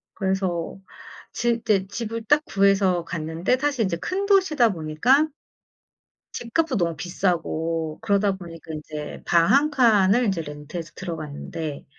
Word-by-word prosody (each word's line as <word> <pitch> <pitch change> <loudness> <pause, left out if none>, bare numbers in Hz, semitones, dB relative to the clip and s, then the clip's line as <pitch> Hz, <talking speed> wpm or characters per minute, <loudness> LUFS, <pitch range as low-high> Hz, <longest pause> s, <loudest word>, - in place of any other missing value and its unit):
그래서 190 -2 -1 0.5
지 235 -1 0
이제 195 -4 +1
집을 230 +2 -5
딱 295 +6 +4
구해서 195 -3 +2
갔는데 165 +8 -1
사실 270 -5 0
이제 170 -3 -1
큰 380 - -2
도시다 370 - +4
보니까 175 - +2 1.1
집값도 255 +2 -1
너무 170 -2 0
비싸고 165 -2 -2
그러다 200 -2 +2
보니까 165 -3 -9
인제 150 0 -7
방 170 - +4
1 295 +2 +4
칸을 230 -3 +4
이제 185 -4 0
렌트해서 150 +3 -7
들어갔는데 155 -3 -6
190 Hz, 280 characters per minute, -24 LUFS, 165-235 Hz, 1.1 s, 딱